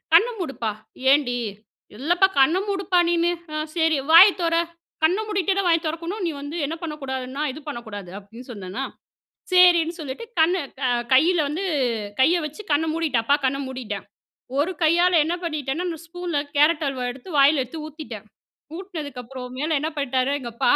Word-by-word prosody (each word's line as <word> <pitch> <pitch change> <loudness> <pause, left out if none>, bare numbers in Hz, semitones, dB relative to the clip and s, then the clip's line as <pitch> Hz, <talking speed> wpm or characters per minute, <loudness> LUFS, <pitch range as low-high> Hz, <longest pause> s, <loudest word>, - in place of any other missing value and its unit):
"கண்ண 380 +9 +7
மூடுப்பா," 270 - -3 0.4
"ஏன்டி?" 270 -4 +3 0.6
"இல்லப்பா, 345 - +3
கண்ண 315 +7 +5
மூடுப்பா 385 -2 +1
நீனு. 345 0 +2 0.2
ஆ 305 - -3 0.2
சரி 320 -3 +2
வாய 335 +4 +11 0.2
தொற 330 0 +1 0.5
கண்ண 350 +6 +3
மூடிட்டேதா 390 -1 +1
வாய 335 -1 +4
திறக்கணும். 335 +6 -4
நீ 335 - 0
வந்து 290 +4 -6
என்ன 315 - -4
பண்ணக்கூடாதுன்னா, 275 -3 -4
இது 305 - -9
பண்ணக்கூடாது." 220 -8 -7
அப்படின்னு 230 +6 -13
சொன்னன்னா! 200 +4 -5 0.7
சரின்னு 350 -2 +5
சொல்லிட்டு 285 - -6
கண்ணு 340 +4 +4 0.3
அ - - +2 0.2
கையில 330 +7 +5
வந்து 330 +7 -3 0.6
கைய 335 +6 +4
வச்சு 305 +8 -7
கண்ண 290 +2 +3
மூடிட்டன். 310 -8 0
அப்பா 285 +4 +4
கண்ண 265 +1 +1
மூடிட்டேன். 235 -6 -5 0.5
ஒரு 320 +6 +1
கையால 345 +3 +4
என்ன 335 - -1
பண்ணிட்டேனா? 305 0 -2
நான் 325 -1 -7
ஸ்பூன்ல, 350 -2 -3 0.2
கேரட் 300 +2 +4
அல்வா 260 -2 -3
எடுத்து 255 +6 -11
வாயில 280 +1 +5
எடுத்து 300 +6 -7
ஊத்தீட்டேன். 310 0 -9 0.5
ஊட்டுனதுக்கப்புறம் 270 -9 -7
மேலே 310 +3 0
என்ன 310 - -1
பண்ணிட்டாரு, 265 -1 0
எங்க 240 -2 -6
அப்பா - - +2
305 Hz, 155 wpm, -23 LUFS, 265-340 Hz, 0.7 s, வாய